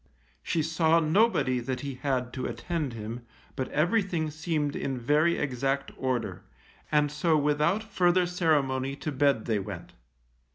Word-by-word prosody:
She 160 - 0
saw 165 +1 +3
nobody 160 - +2
that 125 +1 -3
he 140 -1 -4
had 125 -1 -2
to 130 -1 -3
attend 160 -7 -3
him, 115 +2 -6 0.3
but 130 -2 -2
everything 175 -1 0
seemed 150 -1 -2
in 135 -2 -2
very 150 +7 +2
exact 135 0 -1
order, 130 -3 -2 0.5
and 150 -1 +3
so 155 +2 +2
without 150 +8 +1
further 180 -4 +2
ceremony 140 -7 +1
to 150 +2 -4
bed 140 -4 +2
they 110 -3 +1
went. 95 - -7
150 Hz, 140 wpm, -28 LUFS, 130-165 Hz, 0.5 s, saw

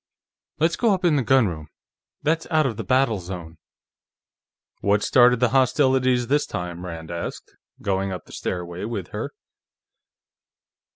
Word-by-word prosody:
Let's 165 +2 +2
go 225 -5 +3
up 185 - -4
in 165 -3 +4
the 140 - +2
gunroom; 105 -12 +2 0.6
that's 160 +2 0
out 155 -2 +3
of 120 -4 -1
the - - -5
battle 130 -5 +2
zone." 85 -3 -8 1.2
"What 100 0 +2
started 125 -1 +5
the 125 -1 +3
hostilities 130 -1 +3
this 145 +4 +1
time?" 90 0 -5
Rand 80 -1 -7
asked, 85 0 -6 0.3
going 95 0 0
up 90 -3 -6
the - - -16
stairway 90 0 -4
with 110 -5 -4
her. - - -4
115 Hz, 140 wpm, -23 LUFS, 90-135 Hz, 1.2 s, started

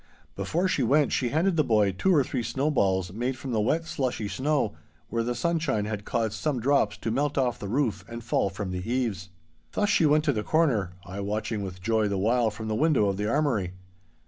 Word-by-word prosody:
Before 175 +3 0
she 165 - 0
went 140 +5 +3
she 125 - +1
handed 170 +5 +1
the 155 - +4
boy 105 -6 +3
two 145 - +1
or 145 - +5
three 125 0 -3
snowballs 100 - 0
made 125 +4 -2
from 130 0 -6
the 110 -2 +1
wet, 160 +10 +1
slushy 125 -8 -2
snow, 135 -2 0 0.4
where 115 +1 0
the 120 +1 -2
sunshine 140 -5 0
had 105 -1 -4
caused 115 -3 -1
some 130 +4 -1
drops 125 -4 +2
to 115 - -3
melt 145 +4 0
off 125 -3 +1
the 100 - -5
roof 110 -7 0
and 115 0 -7
fall 110 -3 +1
from 95 -1 -5
the 90 +5 -4
eaves. 110 -8 -1 0.4
Thus 205 - +1
she 165 - +4
went 150 +1 +4
to 145 -3 +2
the 105 - -1
corner, 115 - +1
I 95 +3 -7
watching 105 +1 -2
with 95 -2 -7
joy 110 0 +2
the 100 -1 -1
while 115 +4 +2
from 110 +1 -7
the 110 - -1
window 130 -4 +3
of 95 - -2
the 105 +1 -1
armoury. 115 -10 0
115 Hz, 220 wpm, -27 LUFS, 105-145 Hz, 0.4 s, or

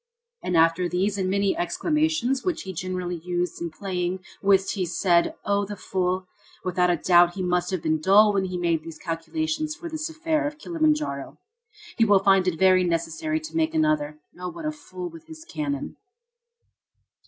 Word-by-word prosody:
And 180 - 0
after 165 +2 +3
these 195 +3 0
and 185 -1 0
many 200 0 +1
exclamations 270 - 0
which 365 -3 -1
he 190 - -6
generally 180 0 -3
used 175 -1 -2
in 170 - -2
playing 180 +1 -3 0.2
whist 195 -1 +3
he 195 - -1
said: 175 0 +2
"Oh, 200 0 +1
the 205 +1 -5
old 205 - -10
fool! 185 0 -1 0.4
Without 180 -1 +1
a 175 - +3
doubt 175 +1 +4
he 190 - -3
must 180 0 0
have 185 -3 -3
been 155 -1 +1
dull 205 +4 +6
when 195 -1 +1
he 180 -1 -3
made 170 -2 +1
his 165 0 -9
calculations 310 - -3
for 340 0 -7
this 315 0 -4
affair 315 -1 -1
of 295 +1 -6
Kilimanjaro. 305 - -1 0.6
He 225 - +6
will 205 -2 +6
find 195 -1 +4
it 170 -3 0
very 185 +1 +5
necessary 170 - -1
to 315 - -9
make 325 0 +1
another. 310 -1 +1 0.2
Oh, 180 0 -4
what 320 - -8
a 305 - 0
fool 185 -12 -8
with 165 -1 -12
his 320 0 -11
cannon!" 290 -4 -4
190 Hz, 185 wpm, -25 LUFS, -, 0.6 s, dull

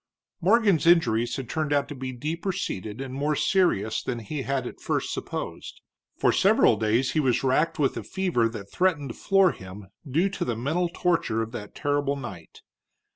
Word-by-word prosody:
Morgan's 200 -4 +3
injuries 120 -9 +3
had 135 -3 -5
turned 155 +1 -2
out 145 -1 +2
to - - -5
be 130 -1 -5
deeper 160 +9 -3
seated 110 - -4
and 130 -1 -6
more 145 +3 0
serious 110 - +1
than 120 - -3
he 135 +6 -5
had 135 -1 -2
at - - -8
first - - -1
supposed. - - -6 0.4
For - - +3
several - - +4
days 110 +5 +1
he 155 - +1
was 130 -4 +1
racked 150 +5 +2
with 140 -4 +1
a - - -2
fever 175 -12 0
that 100 -3 -9
threatened 165 -7 +1
to - - -10
floor 195 -2 +3
him, 95 +1 -11 0.2
due 165 +9 +2
to 195 - -3
the 120 - -1
mental 160 +9 0
torture 165 -11 0
of 110 - -7
that 105 -4 -8
terrible 145 -1 0
night. 120 - -9
140 Hz, 185 wpm, -26 LUFS, 115-165 Hz, 0.4 s, several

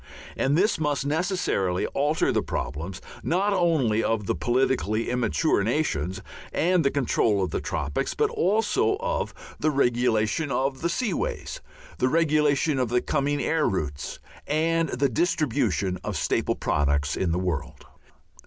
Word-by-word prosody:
And 140 +3 +1
this 205 +2 +2
must 145 -3 0
necessarily 150 - 0
alter 145 +3 +1
the - - +1
problems 80 +9 -4 0.2
not 195 +5 +1
only 155 - +2
of 110 -2 0
the - - 0
politically 120 -3 0
immature 125 0 +1
nations 95 - -1 0.3
and 175 0 +2
the 140 - +3
control 110 -7 +1
of 90 - -2
the - - -2
tropics, 75 -3 -2
but - - +1
also 225 - +1
of - - -2 0.3
the 155 - +2
regulation 120 0 +1
of 135 0 -1
the 170 - 0
sea 215 +2 -1
ways, - - -3 0.4
the 130 - +2
regulation 150 -2 +2
of 125 -3 0
the 125 +1 +2
coming 145 +2 0
air 160 -2 +1
routes, 75 -7 -4 0.3
and 165 +1 +1
the 140 +3 +1
distribution 125 - 0
of - - -3
staple - - 0
products 75 0 0
in 90 -3 0
the 85 - +1
world. 90 -5 -3
135 Hz, 145 wpm, -25 LUFS, 100-160 Hz, 0.4 s, the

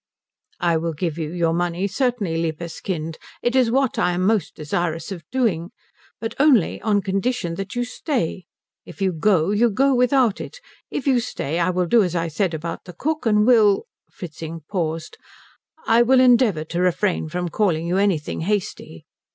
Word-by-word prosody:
"I 170 -2 +2
will 165 0 -2
give 165 +1 -3
you 155 -1 -3
your 170 -2 0
money 175 +2 -1
certainly, 205 -4 -1
liebes 165 0 -3
Kind. 165 -3 -4 0.2
It 240 +1 +1
is 255 -3 +4
what 265 +1 +1
I 180 - +2
am 180 +1 -1
most 215 -1 +1
desirous 165 +3 -3
of 175 -4 -6
doing. 210 -10 0 0.5
But 225 0 -4
only 270 - +3
on 205 -2 +1
condition 195 -2 -1
that 195 +5 -6
you 245 - 0
stay. 240 - -3 0.4
If - - -13
you 190 -1 +1
go, 175 +1 +2
you 230 +3 +3
go 270 +6 +2
without 250 -3 +2
it. - - -8 0.3
If 265 - -4
you 265 -3 +3
stay, 165 - -3
I 175 +1 +2
will 180 0 0
do 230 +6 +4
as 180 -3 -1
I 165 -1 -1
said 170 +2 -1
about 165 +1 -6
the 180 - -10
cook 310 - -2
and 210 -1 +4
will 220 -5 +4
" - - -52
Fritzing 165 -1 -7
paused 165 -4 -3 0.7
"I 230 +1 +4
will 255 +2 +5
endeavour 240 -10 +4
to 170 +3 -3
refrain 180 -2 0
from 175 +2 -3
calling 170 -3 0
you 175 +2 0
anything 190 -7 0
hasty." 185 - -3
185 Hz, 185 wpm, -22 LUFS, 165-230 Hz, 0.7 s, will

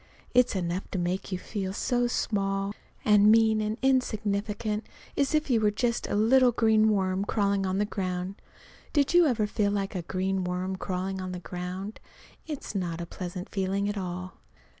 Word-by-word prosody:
It's 250 -3 +4
enough 180 0 -2
to - - -3
make 180 +3 -2
you 185 - 0
feel 190 0 -4
so 245 +3 +1
small 195 -3 -1 0.3
and 210 0 +6
mean 220 -1 +4
and 215 +1 -2
insignificant 215 -4 0 0.3
as 280 +2 +1
if 305 - +1
you 230 -3 +3
were 210 - +4
just 235 +3 -1
a - - -1
little 245 +4 +5
green 220 -1 +4
worm 190 -2 +1
crawling 200 -2 +1
on 185 +1 0
the 205 - +2
ground. 185 -1 -3 0.5
Did 285 +1 +2
you 350 -2 +6
ever 230 -6 +1
feel 210 0 0
like 200 0 -1
a 185 - -2
green 190 +2 -1
worm 180 +1 -2
crawling 190 0 -3
on 185 0 -4
the 180 - -4
ground? 180 +4 -6 0.5
It's 300 -7 -5
not 175 -4 -2
a 170 - -3
pleasant 180 +1 -6
feeling 195 +1 -1
at 205 - -2
all. 185 -1 -5
200 Hz, 180 wpm, -28 LUFS, 185-220 Hz, 0.5 s, and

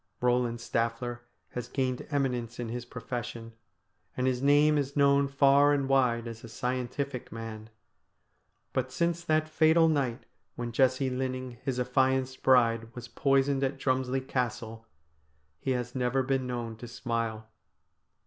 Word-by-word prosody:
Eoland 125 -1 +1
Staffier 115 +1 -2 0.3
has 125 0 -5
gained 130 -1 -2
eminence 125 -5 -1
in 120 -2 -3
his 120 +1 -4
profession, 120 -1 -6 0.6
and 130 - 0
his 130 -1 +1
name 145 +2 +5
is 140 -1 -1
known 140 0 +4
far 140 +1 +5
and 140 -2 0
wide 125 -4 +2
as 115 -1 -8
a 115 - -9
scientific 125 +2 -3
man. 110 -1 -7 1.0
But 130 0 -1
since 170 +4 0
that 155 -2 +1
fatal 160 +1 +4
night 135 -7 0 0.3
when 120 -1 -4
Jessie 130 +2 +2
Linning, 130 -1 -3
his 130 -2 -2
affianced 130 0 +1
bride, 115 -3 +4
was 120 -1 -8
poisoned 135 +2 +2
at 135 +1 -1
Drumslie 130 0 0
Castle, 115 -2 -3 0.7
he - - -4
has 125 -1 -1
never 130 +1 +1
been 130 -1 0
known 120 -2 -4
to 120 - -8
smile. 115 -2 -3
125 Hz, 140 wpm, -29 LUFS, 120-135 Hz, 1.0 s, name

